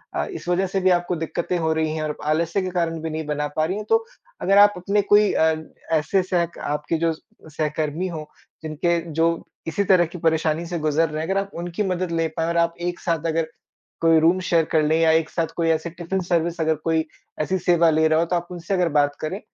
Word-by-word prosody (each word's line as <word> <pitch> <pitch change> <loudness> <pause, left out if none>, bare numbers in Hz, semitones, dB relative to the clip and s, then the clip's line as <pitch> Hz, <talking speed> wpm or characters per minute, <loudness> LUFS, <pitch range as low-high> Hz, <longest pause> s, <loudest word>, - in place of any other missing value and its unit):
अ, - - 0
इस 360 - -8
वजह 185 +2 +1
से 195 +1 -1
भी 185 - +3
आपको 175 0 +1
दिक्कतें 170 +2 -2
हो 160 -1 +1
रही 160 -1 0
हैं 155 - -2
और 150 -1 -3
आलस्य 165 +5 +1
के 185 - -3
कारण 165 -2 -1
भी 160 - -3
नहीं 155 0 -4
बना 150 0 -2
पा 155 - +2
रही 185 +5 -2
है, 210 - -4
तो 450 - +1 0.4
अगर 195 +1 +3
आप 205 0 +7
अपने 200 +3 +1
कोई 210 0 +6
अ, 160 0 +3 0.4
ऐसे 185 +5 +1
सहक 170 -2 -1
आपके 150 +2 -2
जो 165 0 +1
सहकर्मी 155 +2 -4
हो 155 -3 -6 0.3
जिनके 170 +2 0 0.2
जो 165 - +5 0.4
इसी 200 +5 0
तरह 185 -2 +4
की 170 +2 -9
परेशानी 160 0 +1
से 170 0 -4
गुज़र 155 +1 +1
रहे 155 +1 -3
हैं, - - -5
अगर 195 0 +2
आप 195 0 -8
उनकी 175 +4 -3
मदद 185 -2 -2
ले 165 -1 +1
पाएँ 165 0 0
और 170 - -1
आप 170 0 +2
एक 175 0 -3
साथ 165 -2 -2
अगर 165 0 0 0.5
कोई 165 -1 +5
रूम 170 +4 +3
शेयर 170 -3 +2
कर 155 -1 +3
ले 160 +2 +2
या 165 -1 +4
एक 160 -1 +2
साथ 165 -2 -1
कोई 165 -1 +1
ऐसी 160 +1 0
टिफ़िन 175 +3 -3
सर्विस 170 -1 0
अगर 160 0 +2
कोई 160 +1 0 0.4
ऐसी 185 +5 0
सेवा 170 -1 +4
ले 160 0 +3
रहा 155 0 +3
हो, 170 - +2
तो 175 +1 -1
आप 175 0 -2
उनसे 175 +2 -4
अगर 180 -2 +2
बात 145 -1 +2
करें, 170 +6 -3
165 Hz, 240 wpm, -23 LUFS, 160-180 Hz, 0.5 s, आप